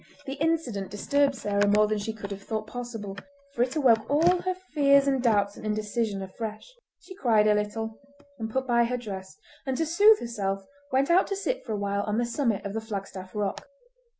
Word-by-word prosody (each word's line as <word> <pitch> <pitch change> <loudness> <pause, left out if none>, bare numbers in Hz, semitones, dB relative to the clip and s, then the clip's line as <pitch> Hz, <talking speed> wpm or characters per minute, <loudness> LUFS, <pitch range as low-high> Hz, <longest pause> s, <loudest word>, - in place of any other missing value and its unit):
The 270 - -4
incident 280 - -1
disturbed 280 +7 +1
Sarah 205 -3 +1
more 210 +1 +5
than 210 0 -1
she 215 +2 -3
could 205 -2 -8
have 200 0 -6
thought 215 +1 -3
possible, 225 -4 -6 0.4
for 240 - -2
it 250 +3 +1
awoke 235 -7 +3
all 340 +5 +4
her 370 0 -1 0.2
fears 280 -2 +5
and 270 -2 +2
doubts 205 -4 +2
and - - -11
indecision 215 -1 -1
afresh. 215 - -7 0.3
She 375 - -11
cried 230 - +3
a 210 - +5
little, 220 +1 -2 0.4
and 220 0 -3
put 265 +4 -1
by 235 -1 +3
her 250 +1 -1
dress, 195 -5 -7 0.3
and 265 -2 -2
to 325 - +1
soothe 410 +7 +6
herself 195 -4 -3 0.3
went 270 +4 +2
out 365 +2 +5
to 395 - -2
sit 455 +6 -2
for 220 - -2
a - - -1
while 200 0 -1
on 210 +1 -1
the 240 - +1
summit 235 -4 -1
of 200 - -4
the 225 - -2
Flagstaff 195 -3 -7
Rock. 205 -2 -2
225 Hz, 205 wpm, -27 LUFS, 205-270 Hz, 0.4 s, soothe